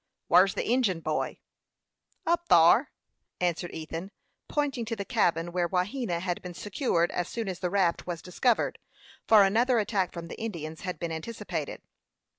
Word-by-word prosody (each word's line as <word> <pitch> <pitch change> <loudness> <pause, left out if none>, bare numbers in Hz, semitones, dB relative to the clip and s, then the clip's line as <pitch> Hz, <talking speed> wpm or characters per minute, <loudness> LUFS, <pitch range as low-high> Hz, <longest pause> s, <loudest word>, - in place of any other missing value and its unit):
"Whar's 185 +2 +5
the - - -2
Injin 230 -9 +2
boy?" 155 -1 -2 0.9
"Up 345 +1 +1
thyer," 170 - +6 0.5
answered 175 -1 -1
Ethan, 165 +3 -6 0.4
pointing 280 -5 -1
to 230 +1 -3
the 200 -2 -5
cabin 175 -8 +1
where 175 -1 0
Wahena 185 +1 -1
had 175 -1 -2
been 180 -1 -8
secured 185 - 0
as 175 0 -2
soon 230 -3 -4
as 185 -2 -4
the 180 - -1
raft 185 -3 +1
was 170 -2 -4
discovered, 225 +6 +1 0.5
for 215 -2 +8
another 235 +6 +3
attack 205 -4 0
from 170 -1 -7
the - - -8
Indians 160 -8 -5
had 180 -1 -4
been 170 -1 -4
anticipated. 165 -2 -5
185 Hz, 160 wpm, -28 LUFS, 170-225 Hz, 0.9 s, for